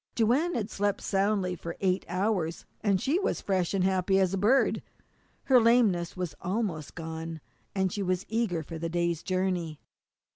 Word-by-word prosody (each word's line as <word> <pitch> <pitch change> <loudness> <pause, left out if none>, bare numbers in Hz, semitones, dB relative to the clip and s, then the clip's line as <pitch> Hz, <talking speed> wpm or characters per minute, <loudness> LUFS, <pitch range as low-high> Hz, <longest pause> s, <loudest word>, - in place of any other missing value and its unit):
Joanne 255 +10 +2
had 215 -2 -2
slept 205 0 0
soundly 195 -2 +1
for 170 -1 -7
eight 190 -1 +1
hours, 180 -3 -1 0.2
and 200 -3 +2
she 290 - +1
was 395 - 0
as - - -7
fresh 185 -3 0
and 190 - +2
as - - +4
happy 190 +1 +2
as 190 -1 +2
a - - +1
bird. 235 +8 +3 0.6
Her 255 -3 +5
lameness 220 -8 +3
was 180 -4 -3
almost 180 -6 -2
gone, 160 0 -5 0.4
and 190 -1 +1
she 205 - -2
was 185 -1 -1
eager 215 -7 -1
for 165 +2 -7
the 165 +1 -2
day's 170 -1 0
journey. 185 -4 -1
190 Hz, 180 wpm, -29 LUFS, 170-210 Hz, 0.6 s, Her